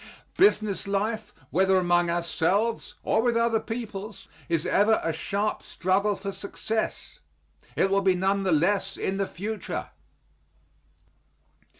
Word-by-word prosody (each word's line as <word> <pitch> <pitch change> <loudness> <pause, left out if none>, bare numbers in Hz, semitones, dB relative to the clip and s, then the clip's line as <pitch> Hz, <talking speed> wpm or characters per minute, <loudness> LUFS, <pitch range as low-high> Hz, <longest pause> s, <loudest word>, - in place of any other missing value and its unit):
Business 215 - +3
life, 210 +3 -1 0.2
whether 190 +2 +3
among 175 -1 +2
ourselves, 175 +6 0
or - - +2
with 240 0 +2
other 230 -1 +2
peoples, 220 -3 -6 0.2
is 165 -2 0
ever 215 +2 +3
a 165 - 0
sharp 200 +6 -2
struggle 195 +3 0
for 195 0 -5
success. 215 +3 -4 0.6
It 195 - +2
will 200 0 +3
be 190 -1 +3
none 195 +2 +1
the 190 -2 0
less 195 +5 +1
in 195 - -2
the 195 -1 0
future. 210 +4 -5
195 Hz, 125 wpm, -26 LUFS, 185-215 Hz, 0.6 s, Business